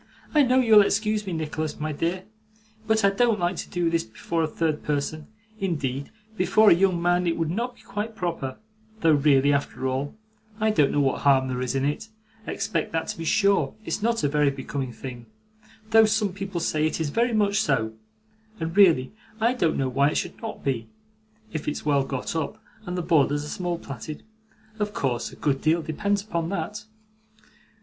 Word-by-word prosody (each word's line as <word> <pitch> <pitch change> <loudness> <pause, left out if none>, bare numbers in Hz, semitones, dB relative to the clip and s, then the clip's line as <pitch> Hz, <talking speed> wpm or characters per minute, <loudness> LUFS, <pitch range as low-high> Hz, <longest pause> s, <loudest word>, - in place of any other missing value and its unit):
'I 300 - +6
know 255 +1 +4
you'll 220 -4 +7
excuse 215 0 0
me, 185 - -2
Nicholas, 155 -1 -3
my 155 +1 -2
dear, 170 +5 -2 0.6
but 220 -1 +3
I 200 - +5
don't 225 +1 +2
like 175 +1 0
to - - -5
do 175 -1 0
this 165 0 +2
before 115 +9 -3
a 160 - +1
third 155 -1 -1
person; 150 +1 -2 0.3
indeed, 140 -7 -2 0.3
before 205 +3 +5
a - - +10
young 180 0 +2
man 175 +1 +2
it 165 - 0
would 165 -1 -1
not 240 +6 -2
be - - -20
quite 215 +2 -4
proper, 165 -9 -3 0.4
though 165 - +5
really, 145 -1 +4
after 140 -2 -2
all, 135 +5 -2 0.4
I 215 0 +3
don't 150 -9 +3
know 145 - +2
what 135 -1 0
harm 135 -2 +4
there 125 0 -2
is 130 +1 -2
in 135 0 +1
it, 150 +10 -2 0.4
except 200 -6 -2
that 160 0 -1
to - - -4
be 165 - -4
sure 200 +3 +2
it's - - -2
not 230 -2 +1
a - - +4
very 145 0 +3
becoming 135 -1 -4
thing, 120 0 -8 0.6
though 225 0 +7
some 215 -3 +1
people 195 -2 -4
say 155 -1 +1
it 155 - -3
is 155 -3 -1
very 240 +6 +2
much 210 -1 +2
so, 110 - 0 0.7
and 165 0 -3
really 170 -10 +5 0.3
I 230 +3 +3
don't 170 -11 +1
know 135 - +1
why 140 +3 +2
it - - -4
should - - -4
not 225 -2 -6
be, 125 -5 -2 0.6
if 155 -2 -4
it's 150 - -3
well 140 -2 +3
got 135 +3 -4
up, 165 +7 -3 0.3
and 180 +1 -3
the 180 - -1
borders 145 -3 +2
are - - -7
small 175 0 -2
plaited; 145 0 -8 0.6
of 210 0 -2
course, 125 -3 -1
a - - -12
good 135 -2 0
deal 165 +1 +2
depends 200 +6 -1
upon 170 -6 -2
that. 210 +2 -4
165 Hz, 200 wpm, -25 LUFS, 145-200 Hz, 0.7 s, a